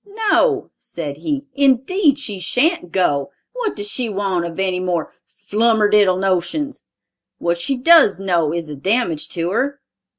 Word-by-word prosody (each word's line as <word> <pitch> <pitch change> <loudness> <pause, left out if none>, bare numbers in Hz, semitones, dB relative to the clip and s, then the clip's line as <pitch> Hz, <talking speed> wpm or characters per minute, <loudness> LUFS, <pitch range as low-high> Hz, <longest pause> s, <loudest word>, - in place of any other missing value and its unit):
"No," 435 -6 +2
said 145 -4 -7
he, 280 - -3
"indeed 280 - +2
she 210 -9 -5
shan't 250 - 0
go! 145 -7 0 0.2
What 485 -4 -3
does 205 -1 -4
she 235 +2 -1
want 195 -4 -1
of 165 - -9
any 185 -1 0
more 180 -3 -2 0.3
flummerdiddle 210 -3 +3
notions? 195 - -1 0.6
What 170 0 -1
she 265 +10 -2
does 320 - +5
know 175 -5 0
is 170 -1 -3
a 150 - -7
damage 185 - -1
to 170 +1 -1
her." 275 +7 -1
205 Hz, 145 wpm, -19 LUFS, 175-270 Hz, 0.6 s, does